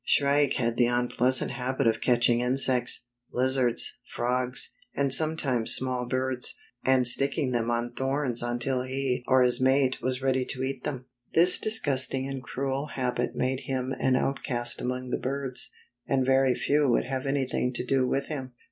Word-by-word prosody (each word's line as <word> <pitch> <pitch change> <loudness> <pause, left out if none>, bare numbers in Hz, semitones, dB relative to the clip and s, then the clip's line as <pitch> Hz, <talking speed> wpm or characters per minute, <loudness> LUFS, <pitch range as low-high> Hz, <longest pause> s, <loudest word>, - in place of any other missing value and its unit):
Shrike 140 -1 +2
had 115 -2 -1
the 120 0 +3
unpleasant 125 +1 +2
habit 130 0 -2
of 110 -1 +1
catching 120 -1 +2
insects, 125 -1 +1 0.3
lizards, 130 -1 +1
frogs, 125 +1 -2 0.2
and 140 -2 +1
sometimes 140 -7 +2
small 125 -1 -2
birds, 130 0 -2 0.3
and 130 -1 +2
sticking 140 +2 +2
them 120 -1 -1
on 120 0 -2
thorns 135 -2 -2
until 120 +2 -1
he 130 -1 -3
or 130 -1 +4
his 125 0 +1
mate 130 0 +2
was 130 +1 -1
ready 130 -1 +1
to 130 0 -3
eat 135 -1 -5
them. 130 -3 -5 0.3
This 175 +2 +9
disgusting 135 -10 +2
and 135 -1 -5
cruel 135 +2 -4
habit 125 -4 -3
made 130 0 -1
him 130 -2 -3
an 130 -1 +2
outcast 125 -3 -2
among 125 0 -4
the - - -1
birds, 135 -1 -3 0.4
and 135 -1 +1
very 135 -1 +3
few 145 -1 +1
would 120 - +1
have 130 +1 -4
anything 130 -2 -1
to 125 - -3
do 130 0 +1
with 135 +2 -1
him. 130 -5 -6
130 Hz, 165 wpm, -26 LUFS, 125-135 Hz, 0.4 s, This